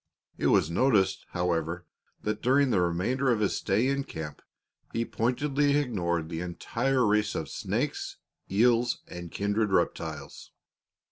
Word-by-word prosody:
It - - +2
was 80 - +3
noticed, 95 -3 +2
however, 85 -1 -1 0.4
that 105 0 -2
during 135 +1 +3
the 95 - +3
remainder 95 +11 +1
of 115 - +1
his 105 - +1
stay 105 +6 +1
in 140 0 0
camp 80 - -7 0.5
he 115 0 0
pointedly 140 +5 +1
ignored 85 - -1
the 80 0 -4
entire 120 +9 0
race 105 0 +2
of - - -3
snakes, - - -2 0.3
eels, 120 +3 +3
and 85 -1 -8
kindred 105 +1 0
reptiles. 80 -5 -2
105 Hz, 135 wpm, -28 LUFS, 85-125 Hz, 0.5 s, was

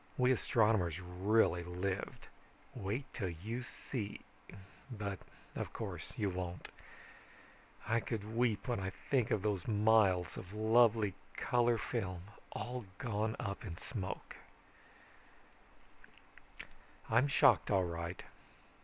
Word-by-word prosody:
We 125 0 +4
astronomers 105 -8 +2
really 90 0 +2
lived. 90 +2 -3 0.5
Wait 105 +8 -3
till 95 -4 -2
you 105 +9 -4
see 120 -3 -5 0.7
but 100 -5 -4 0.4
of - - -4
course - - -5
you 100 -2 +1
won't. 90 -1 -5 1.2
I 115 +1 +3
could 110 -1 -4
weep 120 -1 +1
when 120 -3 0
I 95 0 -2 0.2
think 130 -5 +3
of 100 - +1
those 100 -5 0
miles 105 -4 +4
of 95 +2 -8
lovely 110 -1 +4 0.2
color 120 -1 +3
film, 95 -6 -3 0.3
all 120 +1 -4
gone 110 -1 -1
up 100 +3 -3
in 85 -6 -6
smoke. 95 -3 -5 2.7
"I'm 120 +5 +4
shocked 140 - +5
all 95 -3 +3
right. 85 +1 -4
105 Hz, 110 wpm, -35 LUFS, 95-115 Hz, 2.7 s, shocked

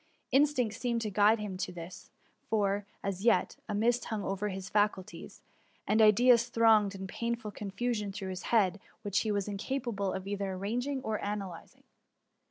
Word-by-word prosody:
Instinct 265 -5 +3
seemed 240 -2 -1
to 215 -2 -3
guide 210 +3 +5
him 205 -3 -5
to 185 - -3
this; 175 +1 -9 0.4
for, 205 -2 +1 0.2
as 195 -1 -3
yet, 230 -1 +3
a 210 - -1
mist 235 +3 +2
hung 215 -3 -3
over 195 +2 -2
his 190 -1 -5
faculties, 205 -2 -2 0.4
and 220 +1 +3
ideas 235 +2 +6
thronged 220 -4 +4
in 190 0 -6
painful 235 +2 -3
confu 210 +5 -3
sion 210 -3 -3
through 195 -1 -5
his 185 0 -5
mind, 200 -4 +3 0.2
which 200 -2 +1
he 215 - -1
was 200 -1 -1
incapable 205 -1 -2
of 190 0 -5
either 200 -1 -3
arranging 245 +8 -2
or 220 -3 -2
analyzing. 195 -5 -6
210 Hz, 170 wpm, -31 LUFS, 195-230 Hz, 0.4 s, ideas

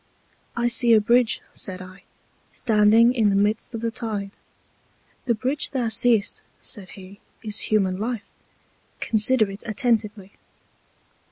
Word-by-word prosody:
I 240 0 +1
see 240 -1 +4
a 220 - +7
Bridge, 235 +2 +2
said 185 -2 -6
I, 185 +1 -13 0.5
standing 225 +1 +4
in 225 -5 +2
the 200 - +1
Midst 210 +4 0
of 225 - -5
the 230 0 -2
Tide. 210 -4 -4 0.9
The 235 -3 +1
Bridge 260 +7 -1
thou 250 -5 -1
seest, 220 -1 +1 0.2
said 190 -3 -8
he, 195 +1 -13 0.2
is 210 -2 -3
human 190 -3 +1
Life, 230 0 -4 0.7
consider 220 -1 +2
it 195 - -9
attentively. 215 -3 -1
215 Hz, 135 wpm, -23 LUFS, 200-235 Hz, 0.9 s, a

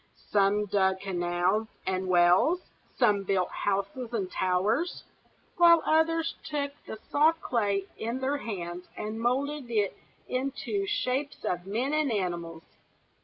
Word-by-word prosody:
Some 205 +1 +3
dug 190 -1 +1
canals 180 +2 0 0.2
and 185 0 -1
wells, 180 - +4 0.4
some 205 -1 +3
built 190 -2 0
houses 200 +5 -2
and 195 -5 -2
towers; 205 - 0 0.5
while 340 -2 +7
others 320 +1 +2
took 295 -3 -2 0.2
the 220 - -6
soft 315 +3 +4
clay 205 -8 0
in 235 +3 -2
their 270 +2 0
hands 180 -7 -5
and 215 +1 -4
moulded 270 +2 -1
it 210 -4 0 0.3
into 275 +10 -2
shapes 285 -8 -2
of 175 +1 -2
men 245 +8 -1
and 305 -4 +1
animals. 170 -5 -3
215 Hz, 125 wpm, -28 LUFS, 190-280 Hz, 0.5 s, while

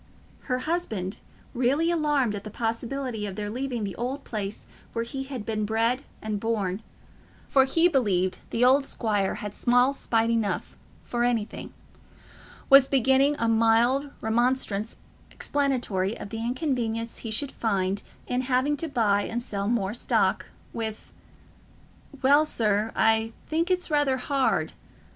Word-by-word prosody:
Her 250 - +2
husband, 225 - -2 0.3
really 275 +7 +2
alarmed 295 -8 +1
at 205 -1 -5
the 215 - -7
possibility 230 +1 -3
of 195 - -6
their 205 0 -4
leaving 250 -1 -3
the 195 -2 -4
old 265 +4 -3
place 205 -2 -5 0.3
where 230 0 -1
he 270 +3 -5
had 260 -6 -6
been 215 -1 -1
bred 225 +4 +1 0.2
and 215 -1 -2
born—for 220 +5 -2
he 330 +6 +3
believed 190 - +1
the 240 +2 +2
old 270 +2 +4
squire 205 -4 0
had 210 -1 -6
small 245 +4 +3
spite 230 -4 0
enough 225 -3 -1 0.3
for 240 0 -1
anything—was 245 +3 0
beginning 270 +2 +3
a 230 - 0
mild 230 +5 +3
remonstrance 225 -2 0 0.3
explanatory 245 -9 -1
of - - -7
the 225 - -5
inconvenience 235 -3 -2
he 225 - -6
should 260 +6 -1
find 200 -3 -1 0.2
in 250 +1 -1
having 260 +3 +1
to 330 - -2
buy 220 -8 +2
and 235 +3 -3
sell 200 -3 -3
more 210 -4 0
stock, 235 - +1 0.3
with, 220 -2 -5 1.1
"Well, 285 +3 +6
sir, 215 -6 +1
I 225 0 +2
think 330 +3 0
as 365 - +5
it's 360 -2 -7
rether 290 -3 +2
hard..." 270 +1 0
235 Hz, 140 wpm, -26 LUFS, 215-270 Hz, 1.1 s, Well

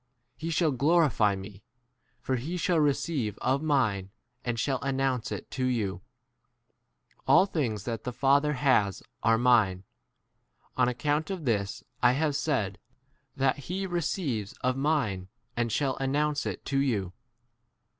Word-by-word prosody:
He 160 - -6
1 - - -1
shall 160 -1 +2
glorify 140 - +3
me, 95 +1 -9 0.6
for 130 - -1
he 160 +9 -4
shall 175 -1 +2
receive 140 - 0
of 135 +3 0
mine 120 -11 +1 0.3
and 120 -2 -2
shall 135 0 0
announce 135 -3 0
1 - - -2
it - - -14
to 130 - -4
15 125 -1 +1
you. 95 -5 -2 1.3
All 190 - +6
things 120 - -2
that 115 -1 -4
the 125 - -3
Father 140 +4 +3
has 125 - +2 0.2
are 115 0 +4
mine; 110 -7 +3 0.9
on 125 -1 +3
account 150 +5 -1
of 185 -6 -4
this 100 -4 -1 0.2
I 125 0 +5
have 145 +1 0
said 130 -10 -1 0.6
that 135 0 +1
he 190 +2 -2
receives 160 - -2
m - - -22
of 130 0 +2
mine 135 -10 0 0.3
and 120 -1 0
shall 135 0 0
announce 145 +2 0
l - - -1
[it] - - -15
to 135 - -1
16 - - +4
you. 95 -6 -2
130 Hz, 160 wpm, -28 LUFS, 110-150 Hz, 1.3 s, All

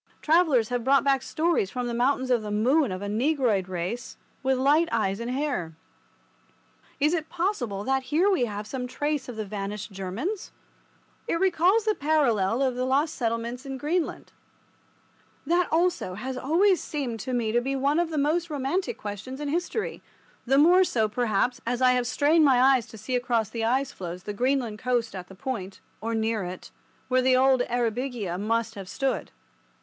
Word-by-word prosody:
Travellers 305 -8 +3
have 245 -1 -1
brought 275 +2 +4
back 275 -2 +2
stories 320 - 0
from 250 +3 -3
the 240 - -3
Mountains 255 +2 +1
of 240 -2 +3
the 210 - -6
Moon 245 +5 +2
of 185 +2 -5
a - - -3
Negroid 225 - +1
race 185 +7 -4 0.2
with 265 -1 +1
light 295 +6 +3
eyes 205 -3 0
and 235 +1 -4
hair. 250 - -2 1.2
Is 300 +3 +3
it 320 -2 -2
possible 330 - -2
that 265 +2 0
here 330 +7 +3
we 375 -11 +3
have 210 -2 -5
some 250 +3 -4
trace 290 +1 -2
of 245 - -6
the 215 -1 -4
vanished 205 +1 -5
Germans? 205 - -4 0.8
It 335 - 0
recalls 380 +4 +3
the 430 - +3
parallel 260 - +1
case 270 - +3
of 250 - -6
the 250 - 0
lost 280 +5 +1
settlements 235 +1 -2
in 270 -1 -5
Greenland. 315 +5 -2 1.1
That 345 +3 +1
also 340 - +1
has 260 +6 -5
always 345 +9 +2
seemed 260 -7 -4
to 255 +5 -5
me 235 -3 0
to 240 +2 +2
be 270 +2 -2
one 280 +4 +1
of 345 -1 0
the 315 - -3
most 320 +4 +1
romantic 295 +6 -2
questions 215 +6 -6
in 295 -1 -3
history—the 335 - -3
more 350 +6 +6
so, 225 -11 +1
perhaps, 240 +3 0
as 240 +1 -2
I 255 -1 +5
have 250 -1 +1
strained 305 +5 +3
my 265 -4 +5
eyes 260 -2 +4
to 220 - -12
see 250 +5 -3
across 240 -3 0
the 230 -1 -3
ice 265 +4 +1
floes 180 -3 -7
the 210 - -5
Greenland 245 -1 0
coast 245 -2 0
at 180 -2 -7
the 190 - -13
point 195 -4 -5 0.2
(or 230 +1 -2
near 220 -1 0
it) 180 +1 -7 0.4
where 255 0 +3
the 255 0 +4
old 260 -1 +4
"Eyrbyggia" 235 -5 -2
must 225 +1 0
have 195 -3 -8
stood. 270 +4 -2
255 Hz, 185 wpm, -26 LUFS, 220-290 Hz, 1.2 s, more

